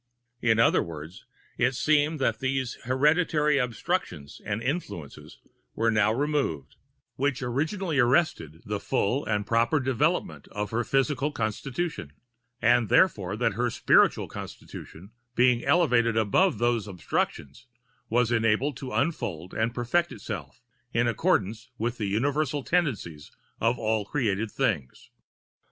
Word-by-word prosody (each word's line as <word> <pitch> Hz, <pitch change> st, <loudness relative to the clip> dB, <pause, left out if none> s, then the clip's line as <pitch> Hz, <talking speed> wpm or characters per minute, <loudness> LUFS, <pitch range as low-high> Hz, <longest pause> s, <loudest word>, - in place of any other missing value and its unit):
In 115 Hz, -2 st, +3 dB
other 115 Hz, -, +4 dB
words, 80 Hz, +1 st, -9 dB, 0.3 s
it 125 Hz, +2 st, +2 dB
seemed 150 Hz, +3 st, +2 dB
that 135 Hz, -, 0 dB
those 130 Hz, -1 st, -1 dB
hereditary 150 Hz, +2 st, +2 dB
obstructions 110 Hz, -, -3 dB
and 100 Hz, 0 st, -2 dB
influences 130 Hz, -, -5 dB, 0.4 s
were 115 Hz, 0 st, +2 dB
now 105 Hz, 0 st, +3 dB
removed, 135 Hz, -, -1 dB, 0.4 s
which 135 Hz, -1 st, 0 dB
originally 155 Hz, -, -1 dB
arrested 120 Hz, -, +1 dB
the 105 Hz, -1 st, -3 dB
full 120 Hz, +6 st, 0 dB
and 105 Hz, -1 st, -1 dB
proper[Pg 115 Hz, +2 st, +2 dB
198] 145 Hz, -4 st, +2 dB
development 130 Hz, -3 st, 0 dB
of 105 Hz, -1 st, -4 dB
her 120 Hz, +2 st, 0 dB
physical 135 Hz, +3 st, 0 dB
constitution; 120 Hz, -, -3 dB, 0.5 s
and, 120 Hz, -2 st, +4 dB
therefore, 105 Hz, -, +3 dB
that 120 Hz, -3 st, +1 dB
her 120 Hz, +4 st, 0 dB
spiritual -, -, +3 dB
constitution, 95 Hz, +7 st, -10 dB, 0.2 s
being 125 Hz, -1 st, +3 dB
elevated 120 Hz, -10 st, +3 dB
above 115 Hz, -, +3 dB
those 120 Hz, -3 st, 0 dB
obstructions, 95 Hz, -, -3 dB, 0.4 s
was 120 Hz, +1 st, +2 dB
enabled 115 Hz, +5 st, +1 dB
to 130 Hz, -2 st, -7 dB
unfold 95 Hz, -, -2 dB
and 115 Hz, +2 st, -1 dB
perfect 155 Hz, +8 st, 0 dB
itself, 85 Hz, -, -7 dB, 0.3 s
in 120 Hz, 0 st, +1 dB
accordance 115 Hz, -, 0 dB
with 120 Hz, +2 st, -2 dB
the 105 Hz, -, -1 dB
universal 140 Hz, +6 st, 0 dB
tendencies 120 Hz, -, -1 dB, 0.3 s
of 115 Hz, +2 st, +1 dB
all 110 Hz, -1 st, 0 dB
created 110 Hz, -3 st, -1 dB
things. 65 Hz, -9 st, -2 dB
120 Hz, 130 wpm, -27 LUFS, 105-140 Hz, 0.5 s, other